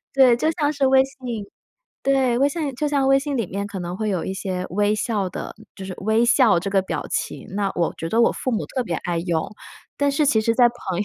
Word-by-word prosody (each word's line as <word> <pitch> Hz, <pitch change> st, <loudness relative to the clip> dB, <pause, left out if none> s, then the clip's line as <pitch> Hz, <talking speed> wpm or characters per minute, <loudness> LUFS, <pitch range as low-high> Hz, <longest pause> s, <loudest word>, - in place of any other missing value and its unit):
对， 260 Hz, -3 st, +6 dB
就 310 Hz, +6 st, +1 dB
像 300 Hz, -3 st, 0 dB
是 280 Hz, -2 st, 0 dB
微 265 Hz, 0 st, +5 dB
信 245 Hz, -6 st, -6 dB, 0.6 s
对 265 Hz, -3 st, +2 dB
微 280 Hz, +1 st, +4 dB
信 290 Hz, -4 st, -3 dB
就 295 Hz, +3 st, -1 dB
像 280 Hz, -2 st, +1 dB
微 270 Hz, 0 st, +5 dB
信 285 Hz, -1 st, -3 dB
里 230 Hz, -6 st, -1 dB
面 200 Hz, +3 st, -4 dB
可 200 Hz, -3 st, -6 dB
能 175 Hz, +1 st, -5 dB
会 215 Hz, 0 st, -2 dB
有 185 Hz, -5 st, -1 dB
一 190 Hz, -, -3 dB
些 185 Hz, -2 st, -3 dB
微 205 Hz, +3 st, +1 dB
笑 205 Hz, -4 st, -1 dB
的 -, -, -6 dB, 0.2 s
就 195 Hz, -, -7 dB
是 190 Hz, -, -6 dB
微 220 Hz, +3 st, +2 dB
笑 235 Hz, -6 st, +4 dB
这 190 Hz, +3 st, -3 dB
个 195 Hz, -1 st, +2 dB
表 -, -, -4 dB
情， -, -, -3 dB
那 200 Hz, -1 st, 0 dB
我 170 Hz, -2 st, 0 dB
觉 165 Hz, -, -4 dB
得 225 Hz, +6 st, +2 dB
我 230 Hz, -, +4 dB
父 255 Hz, -, -3 dB
母 225 Hz, -, -2 dB
特 255 Hz, -, -2 dB
别 170 Hz, -8 st, -3 dB
爱 175 Hz, -1 st, -2 dB
用， 170 Hz, -2 st, -1 dB, 0.5 s
但 285 Hz, 0 st, +2 dB
是 290 Hz, +1 st, +1 dB
其 220 Hz, -4 st, +3 dB
实 230 Hz, +1 st, +1 dB
在 250 Hz, -, +6 dB
朋 195 Hz, -7 st, -5 dB
友 205 Hz, -, 0 dB
230 Hz, 270 characters per minute, -22 LUFS, 190-270 Hz, 0.6 s, 对